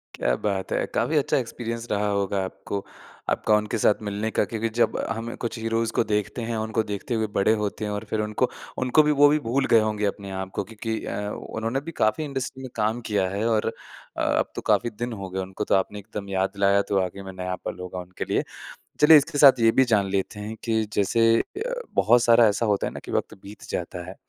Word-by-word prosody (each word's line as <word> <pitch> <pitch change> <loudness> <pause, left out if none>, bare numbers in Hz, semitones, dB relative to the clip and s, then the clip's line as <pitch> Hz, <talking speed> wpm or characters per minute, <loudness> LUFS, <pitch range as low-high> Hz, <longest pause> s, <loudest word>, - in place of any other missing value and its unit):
क्या - - +1
बात 100 -2 -1
है। - - +1
काफ़ी 155 - +1
अच्छा 140 - +2
एक्सपीरियंस 115 -1 -4
रहा 105 0 +1
होगा 100 -1 0
आपको। 100 +1 -5 0.4
आपका 105 - +2
उनके 105 +2 -2
साथ 105 0 +3
मिलने 105 +1 -2
का - - +2
क्योंकि 115 +1 -2
जब 120 - +2
हमें 115 +1 -4
कुछ 115 0 -4
हीरोज़ 115 0 0
इसको 115 +1 0
देखते 105 +3 -1
हैं 115 0 -3
और 110 - -1
उनको 110 0 0
देखते 105 +3 -4
हुए 110 -1 0
बड़े 105 +3 +4
होते 105 +1 -3
हैं 105 - -3
और 105 0 -3
फिर 110 - 0
उनको, 105 +4 0 0.3
उनको 130 +4 +4
भी 150 - +2
वो 145 - +9
भी 150 +1 +3
भूल 135 +3 +1
गए 115 - +8
होंगे 105 -1 0
अपने 100 -1 -3
आप 95 0 -6
को - - -1
क्योंकि 110 0 -4
अ, 105 0 -3
उन्होंने 115 +5 -3
भी - - -3
काफ़ी 110 +9 +2
इंडस्ट्री 135 -2 -4
में 130 - -6
काम 110 +3 0
किया 100 -3 +1
है। 100 +4 -2
और 110 -1 +1 0.5
अ, - - -1
अब - - +1
तो - - -4
काफ़ी 120 - +3
दिन 120 +2 -5
हो 95 - -5
गए 95 +1 -4
उनको 95 +2 -4
तो - - +3
आपने 100 +2 -1
एकदम 100 -1 -7
याद 95 0 +1
दिलाया 100 0 +3
तो 100 -1 +2
वाक़ई 95 +1 -3
में 95 0 -8
नया 90 0 -3
पल - - -4
होगा 90 0 -6
उनके 90 0 -6
लिए। - - 0 0.6
चलिए 155 +1 +9
इसके 145 0 0
साथ 135 -3 +8
ये 115 0 +5
भी 130 - +8
जान 105 -5 +2
लेते 100 +2 -2
हैं 105 +2 -5
कि 110 -1 +1
जैसे 115 +3 +3
अ, 470 +6 -4 0.2
बहुत 120 +1 +5
सारा 115 -1 +6
ऐसा 105 +3 +1
होता 105 -2 +1
है - - -6
ना - - -6
कि - - -7
वक़्त - - -1
बीत 100 +1 -11
जाता 90 0 -4
है। 95 - -9
110 Hz, 235 wpm, -25 LUFS, 100-115 Hz, 0.6 s, वो